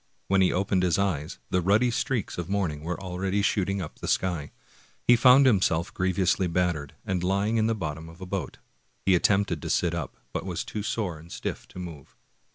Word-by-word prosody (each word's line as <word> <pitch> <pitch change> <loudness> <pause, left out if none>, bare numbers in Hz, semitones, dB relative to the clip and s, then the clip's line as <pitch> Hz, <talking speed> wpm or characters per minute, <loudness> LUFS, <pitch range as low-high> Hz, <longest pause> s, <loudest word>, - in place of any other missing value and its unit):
When 95 0 +4
he 95 - +4
opened 95 0 +1
his 90 -3 +2
eyes, 85 -7 -1
the 90 - +2
ruddy 105 +7 +3
streaks 125 -5 -2
of 85 - -4
morning 90 -7 -1
were 85 +4 -4
already 95 +2 -1
shooting 100 -2 0
up 80 - -9
the - - -5
sky. 85 -6 0 0.6
He 120 - +8
found 125 +3 +7
himself 95 -8 +2
griev 95 -1 -1
ously 95 0 +2
battered, 85 -5 -1
and 90 -2 -1
lying 100 +4 +1
in 110 0 +3
the 115 - +1
bottom 80 -4 -5
of 80 +2 -14
a 95 - -6
boat. 95 -1 -4 0.5
He 95 - +5
attempted 95 -2 +2
to - - -5
sit - - +1
up, - - -4 0.2
but - - -2
was - - -3
too 105 - -5
sore 100 -6 -2
and 85 +2 -14
stiff - - -5
to - - -14
move. 85 -7 -8
95 Hz, 205 wpm, -27 LUFS, 85-100 Hz, 0.6 s, He